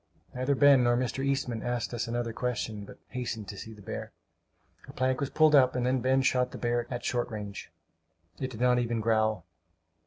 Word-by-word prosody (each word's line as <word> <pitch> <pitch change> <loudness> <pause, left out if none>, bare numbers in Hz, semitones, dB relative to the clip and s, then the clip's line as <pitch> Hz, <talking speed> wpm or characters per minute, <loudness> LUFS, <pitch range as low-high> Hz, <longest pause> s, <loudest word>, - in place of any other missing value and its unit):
Neither 130 +3 0
Ben 140 -2 +6
nor 120 0 +3
Mr. 130 +1 -2
Eastman 135 -4 -1
asked 120 0 -2
us 120 -1 -2
another 120 0 -2
question, 110 -4 -3
but - - -12
hastened 120 -5 -4
to 100 - -6
see 110 +3 -8
the 105 - -15
bear. - - -6 0.7
A - - -10
plank 130 0 0
was 140 - -1
pulled 155 -1 +4
up, 130 -3 +5
and 125 -1 0
then 130 0 +1
Ben 130 +2 +2
shot 125 -1 +2
the - - -8
beast 120 0 -1
at 120 -1 -4
short 120 -1 0
range. 105 -3 -7 0.7
It 130 - -2
did 120 -2 -8
not 125 0 +4
even 120 -1 -1
growl. 110 -1 +1
120 Hz, 205 wpm, -29 LUFS, 115-130 Hz, 0.7 s, Ben